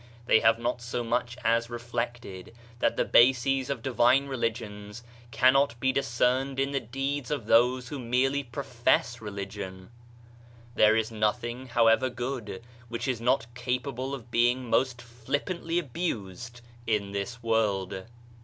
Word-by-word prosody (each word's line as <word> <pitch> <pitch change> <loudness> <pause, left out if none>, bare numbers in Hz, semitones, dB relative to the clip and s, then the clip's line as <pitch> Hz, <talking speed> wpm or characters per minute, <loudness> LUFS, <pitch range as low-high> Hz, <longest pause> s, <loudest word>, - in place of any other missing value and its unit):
They 110 - +5
have 110 0 +4
not 120 +1 -2
so 120 0 -3
much 120 +1 -1
as 115 +1 +2
reflected, 120 -4 -5 0.2
that - - +1
the - - +2
bases 130 +2 +4
of 140 - -3
divine 130 +1 +3
religions 115 -4 -4 0.3
cannot 130 0 +3
be 130 +2 +2
discerned 130 +1 0
in 135 +1 0
the 140 - 0
deeds 135 +2 -3
of 140 -7 -2
those 125 +2 +3
who 145 - -5
merely 130 +3 +1
profess 120 -2 0
religion. 100 -2 -7 0.8
There 110 -2 +5
is 110 0 0
nothing, 120 +4 -2
however 115 +1 +3
good, 120 -5 -5 0.3
which 115 +3 -4
is 125 -3 -1
not 125 +1 +2
cap 125 +1 -2
able 135 0 -4
of 120 -3 -12
being 120 +2 +2
most 125 -2 +1
flippantly 145 +9 -3
abused 120 - -4 0.3
in 105 -3 0
this 110 +4 -5
world. 100 -5 0
120 Hz, 140 wpm, -28 LUFS, 115-130 Hz, 0.8 s, They